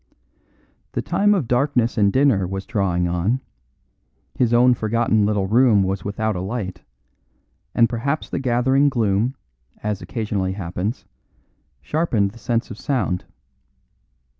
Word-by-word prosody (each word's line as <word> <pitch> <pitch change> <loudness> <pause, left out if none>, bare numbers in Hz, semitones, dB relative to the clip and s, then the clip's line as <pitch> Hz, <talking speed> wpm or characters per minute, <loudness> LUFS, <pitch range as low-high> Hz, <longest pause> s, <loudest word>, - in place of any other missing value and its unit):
The - - -2
time 205 +1 +2
of 160 - -1
darkness 125 -1 +1
and 100 -3 +3
dinner 130 -8 +3
was 95 +1 -5
drawing 95 -5 0
on; 90 +9 0 0.9
his 120 -2 +1
own 125 +1 +5
forgotten 110 -2 +1
little 105 -2 0
room 110 -1 +4
was 95 -1 -2
without 110 +1 -2
a 90 - -3
light, 95 -3 -4 0.9
and 115 - +5
perhaps 130 +6 -2
the - - -3
gathering 130 +2 +2
gloom, 115 0 0 0.5
as 105 -1 -2
occasionally 105 -5 -2
happens, 95 +4 -4 0.8
sharpened 110 - 0
the 115 - -15
sense 115 +1 -1
of 110 - -8
sound. 105 -10 -1
110 Hz, 130 wpm, -21 LUFS, 100-125 Hz, 0.9 s, own